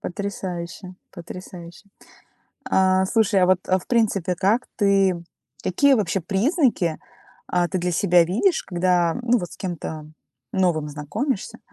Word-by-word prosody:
Потрясающе, 185 -1 -5 0.2
потрясающе. 175 +1 -10 0.8
А, 190 0 +3
слушай, 210 -2 +2
а 180 - +4
вот, 185 0 +3
а, 185 0 +3
в - - -14
принципе, 200 -6 +1
как 200 +8 +1
ты 195 -3 +3 0.5
какие 275 +10 +3
вообще 200 -4 0
признаки, 200 - +1 0.5
а, 175 -1 +1
ты 185 - -2
для 180 +1 -1
себя 175 0 +4
видишь, 230 - +1
когда, 175 -2 +1
ну, 245 0 +3
вот 175 -5 -6
с - - -11
кем-то 160 -4 -5 0.5
новым 170 -5 +1
знакомишься? 150 - -4
185 Hz, 135 wpm, -23 LUFS, 175-200 Hz, 0.8 s, а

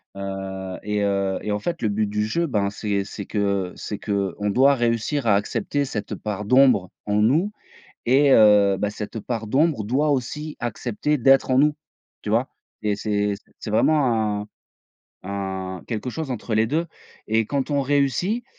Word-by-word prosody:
Heu, 95 -1 -5
et 105 0 -1
heu, 100 -1 0
et 105 - -3
en 105 - 0
fait 170 +11 -3
le 110 - +1
but 105 +1 0
du 105 +1 -1
jeu, 170 +10 0
ben 105 -7 0
c'est 100 -1 -2
c'est 100 0 -7
que 100 -3 -1
c'est 105 - -5
qu'on 100 0 -2
doit 135 +6 +5
réussir 120 +2 0
à 105 - +5
accepter 140 +7 -1
cette 105 -6 -4
part 105 -1 -4
d'ombre 125 -5 +4 0.2
en 105 - 0
nous 140 - +3 0.5
et 135 +3 +4
heu, 105 -4 +6
bah 105 - -1
cette 105 +1 -6
part 115 0 -4
d'ombre 140 +1 +2
doit 135 +8 +1
aussi 150 +3 -3
accepter 120 +5 -1
d'être 135 +1 +4
en 130 - +4
nous, 150 +2 +4 0.5
tu - - -5
vois? 115 +5 +2 0.3
Et 105 -1 0
c'est 105 0 0 0.3
c'est - - -6
vraiment 110 -5 +2
un - - -14 0.8
un 95 -2 -4
quelque 120 +2 -3
chose 155 +2 -5
entre 120 -2 -3
les 110 +1 +3
2 160 +8 0 0.4
et 110 +1 +2
quand 140 +2 -2
on 145 -1 +2
réussit, 145 - +1
110 Hz, 175 wpm, -23 LUFS, 100-135 Hz, 0.8 s, heu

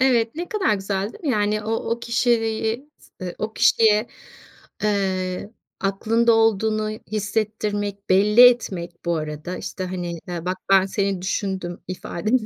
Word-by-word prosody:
Evet 240 -3 +3
ne 345 +2 -5
kadar 385 - +1
güzel 195 +1 -2
değil - - -14
mi? 285 - +1
Yani 210 -2 +1
o 220 - -4
o 230 +1 -2
kişiliği 235 +2 0
s - - -21
ııı, 180 -1 -4
o 220 0 -3
kişiye, 220 0 +4 0.8
eee, 190 -1 -1 0.3
aklında 225 +4 +2
olduğunu 220 -1 +2
hissettirmek, 210 -1 -3
belli 210 +5 +5
etmek 175 -8 -5
bu 170 -1 +1
arada, 155 +3 -5
işte, 185 - -5
hani, 175 -2 -4
ııı, 170 -2 -4
"Bak 185 +1 -2
ben 195 -1 +6
seni 195 -2 -1
düşündüm." 190 -2 -3
ifadeni 215 +6 -1
205 Hz, 145 wpm, -23 LUFS, 185-225 Hz, 0.8 s, ben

